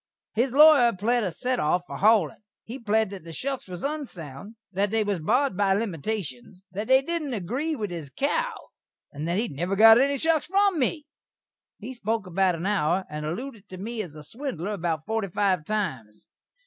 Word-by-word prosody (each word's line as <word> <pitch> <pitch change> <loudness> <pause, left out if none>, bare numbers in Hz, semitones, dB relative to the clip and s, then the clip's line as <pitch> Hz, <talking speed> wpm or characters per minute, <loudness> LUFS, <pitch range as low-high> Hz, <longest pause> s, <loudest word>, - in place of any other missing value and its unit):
His 240 +4 +1
lawyer 280 -4 +7
pled 235 +4 +1
a 185 - -1
set 250 +9 -2
off 175 +4 +1
for - - -7
haulin'. 205 -8 +3 0.2
He 245 +4 -8
pled 220 -2 +1
that 195 -4 -8
the 165 - -9
shuks 270 - -4
was 180 -1 -8
unsound; 205 - -6 0.2
that 200 +2 +1
they 220 +1 +1
was 205 -3 -1
barred 265 - +1
by 195 0 +2
limitashuns; 185 - -4
that 210 +3 -4
they 265 +1 +5
didn't 305 -4 -2
agree 255 - -2
with 210 -7 -4
his 165 -5 -6
cow; 485 - 0 0.6
and 150 +2 -5
that 170 +2 0
he 230 +3 0
never 175 +6 -2
got 225 +3 +8
any 280 +1 +2
shuks 320 +1 +1
from 390 -1 +2
me. 295 +3 0 0.7
He 235 +5 -7
spoak 225 -2 -2
about 185 -1 +1
a 170 - -4
hour, 190 -2 +1
and 150 0 -4
allooded 215 - -6
to 185 - -8
me 220 +4 -4
as 170 -7 -8
a 150 - -10
swindler 215 - -5
about 165 -6 -2
forty 220 -2 -1
five 185 -3 0
times. 155 - -3
210 Hz, 190 wpm, -26 LUFS, 175-250 Hz, 0.7 s, got